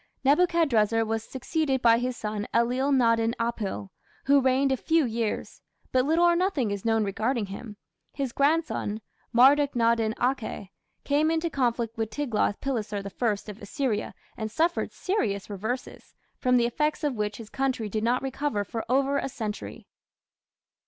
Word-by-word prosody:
Nebuchadrezzar 275 Hz, -, +3 dB
was 225 Hz, 0 st, -2 dB
succeeded 270 Hz, +2 st, -1 dB
by 230 Hz, -2 st, +5 dB
his 250 Hz, 0 st, -2 dB
son 210 Hz, 0 st, -3 dB
Ellil 250 Hz, +4 st, +2 dB
nadin 230 Hz, -3 st, +3 dB
apil, 230 Hz, -4 st, -3 dB, 0.4 s
who 280 Hz, 0 st, +5 dB
reigned 265 Hz, +1 st, +2 dB
a -, -, +3 dB
few 320 Hz, +3 st, +2 dB
years; 230 Hz, -2 st, -3 dB, 0.3 s
but 255 Hz, 0 st, +3 dB
little 325 Hz, +4 st, +3 dB
or 345 Hz, 0 st, +5 dB
nothing 340 Hz, -, 0 dB
is 200 Hz, -1 st, -4 dB
known 225 Hz, -1 st, +2 dB
regarding 220 Hz, +3 st, -1 dB
him. 205 Hz, +2 st, -8 dB, 0.3 s
His 275 Hz, -3 st, -3 dB
grandson, 280 Hz, -7 st, 0 dB, 0.3 s
Marduk 275 Hz, +4 st, +5 dB
nadin 230 Hz, -1 st, +2 dB
akhe, 245 Hz, -6 st, -2 dB, 0.3 s
came 295 Hz, +2 st, +2 dB
into 325 Hz, +1 st, 0 dB
conflict 235 Hz, -4 st, -1 dB
with 220 Hz, -1 st, -1 dB
Tiglath 225 Hz, -5 st, -1 dB
pileser 225 Hz, -6 st, -2 dB
I 205 Hz, +1 st, -2 dB
of 205 Hz, -, -14 dB
Assyria, 215 Hz, +1 st, -2 dB, 0.2 s
and 220 Hz, -1 st, -4 dB
suffered 330 Hz, +9 st, 0 dB
serious 210 Hz, -, -2 dB
reverses, 220 Hz, +6 st, -5 dB, 0.2 s
from 250 Hz, -1 st, +3 dB
the 235 Hz, -, +3 dB
effects 300 Hz, +6 st, -1 dB
of 290 Hz, -2 st, +1 dB
which 210 Hz, -2 st, -2 dB
his 225 Hz, -2 st, -10 dB
country 260 Hz, -5 st, -1 dB
did 215 Hz, +1 st, -2 dB
not 245 Hz, +3 st, +1 dB
recover 270 Hz, -5 st, -1 dB
for 225 Hz, +3 st, -5 dB
over 275 Hz, +2 st, +2 dB
a -, -, -3 dB
century. 220 Hz, -5 st, -6 dB
240 Hz, 155 wpm, -27 LUFS, 220-275 Hz, 0.4 s, by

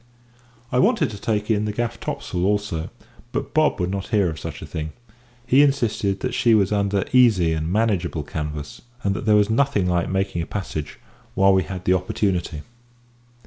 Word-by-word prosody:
I 125 Hz, -, +2 dB
wanted 200 Hz, -, +3 dB
to 105 Hz, -, -9 dB
take 105 Hz, 0 st, -1 dB
in 105 Hz, -1 st, +1 dB
the 105 Hz, -, -1 dB
gaff 120 Hz, +2 st, -3 dB
topsail 90 Hz, -5 st, -3 dB
also, 100 Hz, -4 st, -1 dB, 0.4 s
but -, -, -4 dB
Bob 155 Hz, -6 st, +2 dB
would 90 Hz, 0 st, -1 dB
not 95 Hz, -1 st, -3 dB
hear 100 Hz, -6 st, +2 dB
of 80 Hz, -, -8 dB
such -, -, -7 dB
a -, -, -6 dB
thing. 80 Hz, 0 st, -5 dB, 0.5 s
He 130 Hz, +3 st, +5 dB
insisted 115 Hz, -8 st, +1 dB
that 130 Hz, -2 st, -2 dB
she 120 Hz, -3 st, +4 dB
was 100 Hz, -2 st, +2 dB
under 100 Hz, -1 st, +1 dB
easy 105 Hz, -10 st, +5 dB
and 80 Hz, +1 st, -2 dB
manageable 95 Hz, -7 st, 0 dB
canvas, 75 Hz, -1 st, -6 dB, 0.2 s
and 100 Hz, -1 st, +1 dB
that 95 Hz, -, -5 dB
there 105 Hz, -, +6 dB
was 105 Hz, +1 st, +3 dB
nothing 125 Hz, -5 st, +2 dB
like 90 Hz, -1 st, 0 dB
making 95 Hz, -2 st, -1 dB
a 80 Hz, -, -5 dB
passage 80 Hz, -7 st, -5 dB, 0.4 s
while 95 Hz, 0 st, +5 dB
we 95 Hz, -, +4 dB
had 95 Hz, -1 st, -6 dB
the 90 Hz, -, +4 dB
opportunity. 90 Hz, -3 st, -1 dB
100 Hz, 185 wpm, -22 LUFS, 90-110 Hz, 0.5 s, there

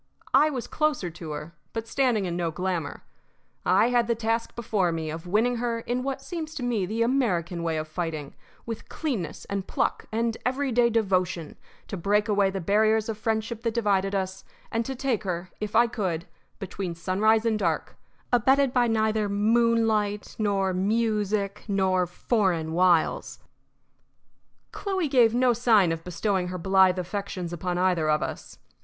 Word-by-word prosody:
I 295 Hz, +4 st, +6 dB
was 260 Hz, -5 st, -4 dB
closer 300 Hz, -, -1 dB
to 165 Hz, -1 st, -9 dB
her, 150 Hz, +3 st, -7 dB, 0.2 s
but 225 Hz, 0 st, -4 dB
standing 245 Hz, -6 st, +1 dB
in 175 Hz, -1 st, -2 dB
no 175 Hz, -1 st, -1 dB
glamour; 170 Hz, -, -3 dB, 0.6 s
I 195 Hz, +6 st, +4 dB
had 240 Hz, -2 st, +2 dB
the 235 Hz, -, +1 dB
task 230 Hz, +1 st, -1 dB
before 210 Hz, -6 st, 0 dB
me 160 Hz, -1 st, -3 dB
of 165 Hz, +3 st, -7 dB
winning 225 Hz, +6 st, +2 dB
her 230 Hz, -1 st, -2 dB
in 245 Hz, +2 st, -2 dB
what 270 Hz, +1 st, -3 dB
seems 325 Hz, -3 st, -5 dB
to 255 Hz, -, -4 dB
me 225 Hz, -6 st, 0 dB
the 225 Hz, +3 st, 0 dB
American 190 Hz, -10 st, 0 dB
way 165 Hz, -1 st, -1 dB
of 155 Hz, 0 st, -3 dB
fighting 155 Hz, -3 st, -4 dB, 0.3 s
with 230 Hz, -2 st, -6 dB
cleanness 225 Hz, -, -4 dB
and 200 Hz, -1 st, -4 dB
pluck -, -, -1 dB
and 230 Hz, +1 st, 0 dB
everyday 250 Hz, -2 st, +2 dB
devotion 185 Hz, -7 st, 0 dB, 0.3 s
to 195 Hz, -, -5 dB
break 205 Hz, +4 st, +1 dB
away 200 Hz, -2 st, +3 dB
the 195 Hz, 0 st, -3 dB
barriers 215 Hz, +4 st, +2 dB
of 220 Hz, -, -3 dB
friendship 225 Hz, 0 st, -2 dB
that 230 Hz, -1 st, -2 dB
divided 200 Hz, -3 st, +1 dB
us, 190 Hz, 0 st, -3 dB, 0.3 s
and 230 Hz, 0 st, 0 dB
to 265 Hz, -, -4 dB
take 255 Hz, -4 st, -1 dB
her, 180 Hz, -2 st, -4 dB
if 210 Hz, 0 st, -4 dB
I 235 Hz, +2 st, +6 dB
could, 185 Hz, -8 st, -2 dB, 0.3 s
between 190 Hz, -3 st, -5 dB
sunrise 215 Hz, +6 st, +2 dB
and 220 Hz, -2 st, +1 dB
dark, 170 Hz, -5 st, -1 dB, 0.4 s
abetted 265 Hz, +2 st, +4 dB
by 245 Hz, -1 st, +3 dB
neither 220 Hz, -2 st, +1 dB
moonlight 215 Hz, -1 st, +1 dB
nor 195 Hz, -3 st, +1 dB
music 210 Hz, 0 st, 0 dB
nor 190 Hz, -3 st, +1 dB
foreign 175 Hz, -4 st, 0 dB
wiles. 175 Hz, -1 st, +2 dB, 1.3 s
Chloe 380 Hz, -5 st, -2 dB
gave 240 Hz, -5 st, +4 dB
no 250 Hz, 0 st, +4 dB
sign 220 Hz, -7 st, +4 dB
of 165 Hz, 0 st, -4 dB
bestowing 180 Hz, +1 st, -1 dB
her 180 Hz, 0 st, -4 dB
blithe 190 Hz, +1 st, +4 dB
affections 185 Hz, -1 st, -4 dB
upon 175 Hz, +1 st, -2 dB
either 180 Hz, -4 st, +2 dB
of 150 Hz, 0 st, +2 dB
us. -, -, -6 dB
205 Hz, 165 wpm, -26 LUFS, 180-230 Hz, 1.3 s, I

